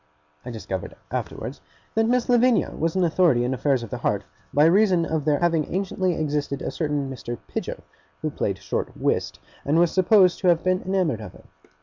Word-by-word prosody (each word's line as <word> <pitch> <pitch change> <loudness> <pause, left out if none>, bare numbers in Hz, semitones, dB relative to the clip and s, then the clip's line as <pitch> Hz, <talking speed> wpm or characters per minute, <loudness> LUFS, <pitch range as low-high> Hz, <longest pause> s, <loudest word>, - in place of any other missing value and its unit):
I 125 - -7
discovered 95 -5 -5 0.2
afterwards - - -5 0.3
that 225 0 +2
Miss 245 0 +1
Lavinia 245 -1 +3
was 165 +2 -2
an 185 - +2
authority 165 -7 +3
in 125 +2 0
affairs 130 -1 +1
of 115 - -9
the - - -4
heart, - - 0 0.3
by 145 +2 +4
reason 180 -1 +4
of 160 -3 -2
there 150 -2 +3
having 165 -2 +1
anciently 185 -1 -1
existed 145 -2 -2
a - - -2
certain 145 -3 -1
Mr. 120 -2 -6
Pidger, - - -4 0.4
who 155 - -1
played 100 -7 -2
short 100 - -4
whist, - - -1 0.2
and 145 +3 +1
was 170 0 +4
supposed 185 -1 +4
to 185 - 0
have 170 -2 +4
been 185 0 +1
enamoured 180 - 0
of 105 -4 -9
her. - - -16
160 Hz, 195 wpm, -24 LUFS, 140-185 Hz, 0.4 s, by